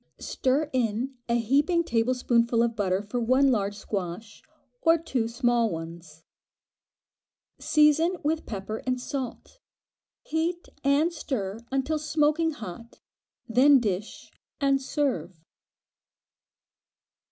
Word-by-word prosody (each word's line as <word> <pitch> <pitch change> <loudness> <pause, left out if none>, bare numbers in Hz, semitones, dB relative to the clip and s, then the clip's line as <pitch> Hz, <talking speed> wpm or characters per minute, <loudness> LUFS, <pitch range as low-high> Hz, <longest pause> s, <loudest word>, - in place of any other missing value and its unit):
Stir 275 +4 0
in 245 +1 -1
a 235 - +2
heaping 285 +9 +2
tablespoonful 235 -2 +2
of 235 -1 -1
butter 195 -2 0
for 210 +4 -3
one 260 +4 +3
large 205 -3 0
squash, 200 0 -5 0.4
or 330 0 +5
two 265 -8 -2
small 235 -1 +1
ones. 165 -2 -8 1.4
Season 310 +4 +3
with 315 +2 -1
pepper 210 +1 -4
and 255 0 0
salt; 260 - -6 0.6
heat 335 +2 -2 0.2
and 290 +5 +3
stir 225 - -4
until 270 +4 0
smoking 305 +1 +1
hot, 230 - -9 0.5
then 265 +4 +6
dish 205 -2 -4 0.3
and 275 -2 +2
serve. 190 - -2
250 Hz, 105 wpm, -27 LUFS, 215-295 Hz, 1.4 s, then